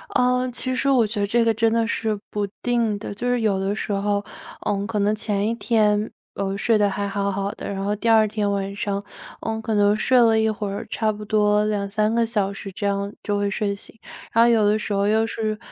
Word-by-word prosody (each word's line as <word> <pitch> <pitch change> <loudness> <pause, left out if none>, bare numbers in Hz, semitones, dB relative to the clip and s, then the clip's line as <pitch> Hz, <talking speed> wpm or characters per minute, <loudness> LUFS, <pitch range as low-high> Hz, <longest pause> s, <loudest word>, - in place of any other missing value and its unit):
呃， 250 0 +2
其 255 +2 -1
实 275 +2 +1
我 250 -4 +4
觉 210 0 -4
得 200 - +1
这 235 +3 +2
个 225 - +3
真 225 +1 +2
的 230 0 +2
是 220 -2 -1
不 205 -1 -2
定 235 -4 +1
的。 205 - -6
就 245 +5 -3
是 245 -1 +1
有 205 -3 +1
的 195 +1 -1
时 215 - -3
候， 200 0 0 0.4
嗯， 200 0 0
可 220 -2 -2
能 205 +1 +2
前 210 -1 -1
1 230 - 0
天， 215 -3 +1 0.2
我 195 0 -2
睡 225 +2 +2
得 205 -1 +3
还 200 +1 -2
好 200 0 -1
好 195 +1 -2
的， - - -8
然 195 0 -3
后 205 +1 0
第 230 +3 -1
2 220 -1 +5
天 210 -1 -1
晚 200 0 -2
上， 200 0 -2 0.4
嗯， 220 0 -3
可 220 -1 -2
能 205 0 +4
睡 255 +4 +2
了 225 -2 +5
一 220 0 +2
会 210 -1 -3
儿， 200 - -5
差 220 -1 0
不 210 0 -8
多 210 0 +2
2-3 210 +1 0
个 235 0 +2
小 210 -4 -1
时， 195 0 -8
这 200 +2 -5
样 200 +1 -2
就 205 -1 -1
会 205 0 0
睡 200 -1 -1
醒。 200 - -11 0.3
然 230 - +5
后 235 - +5
有 225 -3 +4
的 210 +1 +3
时 210 - -3
候 200 0 +1
又 220 +1 +3
是， 215 -1 -2
210 Hz, 250 characters per minute, -23 LUFS, 200-225 Hz, 0.4 s, 2